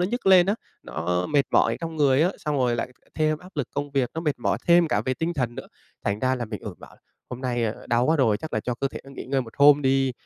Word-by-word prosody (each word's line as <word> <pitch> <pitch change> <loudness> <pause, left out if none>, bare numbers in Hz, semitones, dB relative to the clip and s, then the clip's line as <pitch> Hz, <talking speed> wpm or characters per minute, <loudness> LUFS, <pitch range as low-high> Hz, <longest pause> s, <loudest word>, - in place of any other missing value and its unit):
nó 180 - +2
nhức 240 +3 -4
lên 185 -2 +7
á, 200 - +2 0.3
nó 90 +3 -2
mệt 145 -2 +3
mỏi - - +3
trong 165 -1 -5
người 140 -1 +4
á, 175 - +3
xong 150 -2 -2
rồi 125 -3 +1
lại 115 - -2 0.3
thêm 155 -1 +1
áp 180 - -14
lực 145 -5 -2
công 145 0 -3
việc, 135 -3 0
nó 160 - -2
mệt 150 -4 -1
mỏi - - 0
thêm 170 -1 +5
cả - - +1
về 130 - 0
tinh 165 +5 -2
thần 125 -5 -2
nữa. - - -8 0.4
Thành 100 +1 0
ra 130 +3 +1
là, 125 -2 -3
ừ, - - -12
mình 105 - -5 0.2
bảo - - -12
là - - -27 0.3
"Hôm 125 - -6
nay 120 -2 -1 0.2
đau 120 +1 +2
quá 160 - +3
rồi, 115 -7 +3
chắc 155 +9 -8
là 110 - 0
cho 125 +3 -3
cơ 135 +3 -2
thể - - -8
nó 135 - -13
nghỉ 135 - -8
ngơi 135 +1 0
một 115 -2 -12
hôm 145 0 +6
đi." 135 -1 +2
135 Hz, 295 wpm, -25 LUFS, 125-155 Hz, 0.4 s, lên